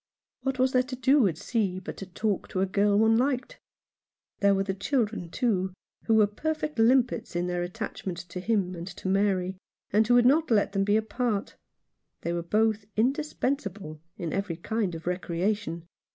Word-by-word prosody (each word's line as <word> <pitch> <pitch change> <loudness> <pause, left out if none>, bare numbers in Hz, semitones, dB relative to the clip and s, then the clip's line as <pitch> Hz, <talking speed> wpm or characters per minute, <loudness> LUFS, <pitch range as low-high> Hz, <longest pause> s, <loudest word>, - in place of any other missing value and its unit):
What 270 -1 -1
was 255 0 +3
there 255 - +4
to 255 +1 -6
do 260 -1 +4
at 165 -4 -2
sea 200 -3 -1
but 190 - -7
to 195 - -7
talk 200 +2 -2
to 185 - -2
a - - +3
girl 200 +1 +2
one 225 +1 +4
liked? 265 - -1 0.8
There 200 0 +4
were 195 - +1
the 195 -1 -2
children, 215 -4 -1
too, 190 -4 0 0.3
who 225 - +3
were 215 -1 +6
perfect 305 +6 -3
limpets 240 -3 +3
in 175 0 0
their 180 0 -1
attachment 185 -1 -5
to 180 - -5
him 195 -2 0
and 170 0 -7
to 190 0 -7
Mary, 190 -1 +1 0.3
and 215 +1 +4
who 245 - +5
would 245 0 +5
not 305 +5 +4
let 210 -3 +3
them 195 -1 +1
be 205 +1 +3
apart. 220 -1 -2 0.7
They 170 - -2
were 170 - -1
both 215 +4 +1
indispensable 230 - -1 0.2
in 170 -4 -4
every 195 -3 -2
kind 205 -1 -2
of 165 - -9
recreation. 180 0 -2
205 Hz, 180 wpm, -27 LUFS, 185-240 Hz, 0.8 s, were